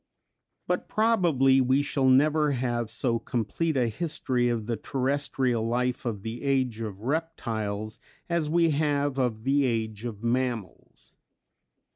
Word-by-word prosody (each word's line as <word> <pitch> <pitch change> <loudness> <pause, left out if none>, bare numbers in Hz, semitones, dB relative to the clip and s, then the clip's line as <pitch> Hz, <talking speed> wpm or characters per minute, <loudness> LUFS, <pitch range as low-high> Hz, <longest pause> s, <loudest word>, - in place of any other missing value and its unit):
But - - -2
probably 170 - +3
we 130 +3 +2
shall 135 -2 +1
never 150 +2 +4
have 120 -3 -1
so 115 -1 -1
complete 125 +7 -1
a 125 -2 +2
history 125 -2 -1
of 115 -3 -1
the 115 +1 -1
terrestrial 130 -1 0
life 125 +1 -1
of 105 -4 -3
the 115 +1 -5
Age 130 -5 0
of 105 -3 -6
Reptiles 110 -8 -3 0.3
as 170 -3 0
we 165 0 +3
have 145 -2 0
of 115 -4 -1
the 140 +2 +2
Age 110 -3 -2
of 110 -2 -6
Mammals. 120 -4 -3
130 Hz, 135 wpm, -27 LUFS, 115-145 Hz, 0.3 s, never